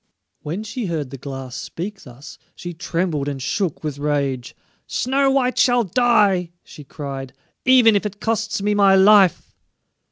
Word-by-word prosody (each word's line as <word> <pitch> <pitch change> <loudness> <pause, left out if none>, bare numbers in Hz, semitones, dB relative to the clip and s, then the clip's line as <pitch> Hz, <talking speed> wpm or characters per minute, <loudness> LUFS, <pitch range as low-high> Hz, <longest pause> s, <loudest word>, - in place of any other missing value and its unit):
When 170 +8 -5
she 225 0 -5
heard 155 -6 -3
the 135 - -8
Glass 135 -2 -7
speak 195 +4 -6
thus 125 +1 -13 0.2
she 175 0 -7
trembled 170 -4 -2
and 140 -2 -4
shook 165 +6 -2
with 145 -2 -4
rage. 140 -4 -2 0.3
"Snow 270 +2 +1
white 260 -2 +1
shall 245 -1 +4
die," 205 -4 +2
she 150 - -13
cried, 135 -2 -7 0.3
"even 245 -4 +6
if 205 +1 +1
it 205 0 -11
costs 220 -2 -2
me 210 0 +1
my 200 -1 +5
life!" 195 -2 +4
185 Hz, 155 wpm, -21 LUFS, 145-215 Hz, 0.3 s, even